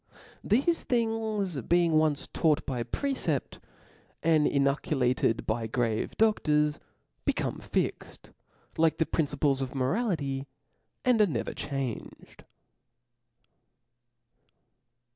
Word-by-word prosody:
Thefe 275 - +2
things 220 - -1
being 170 +6 +2
once 155 -2 +2
taught 160 -2 +2
by 125 -3 -2
precept, 270 - -2 0.6
and 155 -2 +4
inculcated 135 -4 +1
by 115 +1 -1
grave 115 -1 -1
dodors, 150 -9 +2 0.5
be^. - - +2
come - - -2
fixed, - - -3 0.5
like 160 -1 +3
the 160 - +2
principles 145 -3 0
of 135 +1 -4
morality, 140 - -1 0.6
and 245 -3 +4
are 210 - +5
never 160 - -3
changed. 135 -5 -6
150 Hz, 95 wpm, -28 LUFS, 135-200 Hz, 0.6 s, are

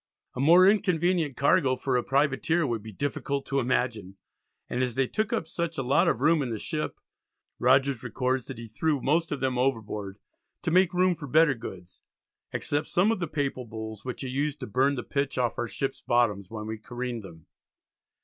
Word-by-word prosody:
A - - -5
more 170 +7 +7
inconvenient 175 - +2
cargo 140 -2 +3
for 130 0 -1
a 125 - +3
privateer 145 +4 +1
would 115 -5 -2
be 110 +1 -9
difficult 140 +4 -3
to 135 - 0
imagine, 115 -6 -1 0.5
and 125 - -2
as 125 -2 -1
they 135 0 +2
took 215 - -2
up - - 0
such 170 0 -3
a 135 - -1
lot 130 +3 +3
of 115 - +1
room 160 +2 +4
in 130 - -2
the 115 - -3
ship, 150 +7 -4 0.6
Rogers 130 0 +3
records 125 +1 -1
that 135 - -7
he 115 - -7
threw 145 +7 -1
most 160 +5 +1
of 145 - -3
them 130 -2 0
overboard 105 -6 -2 0.5
"to - - 0
make 180 0 +4
room 180 0 +4
for 155 -4 -8
better 155 +1 +5
goods," 90 -7 -10 0.5
except 145 +1 -2
some 190 +5 +3
of 225 - -1
the 170 - -2
Papal 140 -4 -2
Bulls 110 -1 -7
which 125 - -5
he 135 - -4
used 145 +3 -2
"to - - -3
burn 130 +7 +2
the 120 - -4
pitch 140 -2 -2
off 120 -2 0
our 120 - -1
ships' 135 +3 -3
bottoms 105 -6 +1
when 110 -1 -6
we 110 0 -5
careened 120 +1 -5
them." 80 -5 -13
135 Hz, 200 wpm, -27 LUFS, 120-150 Hz, 0.6 s, more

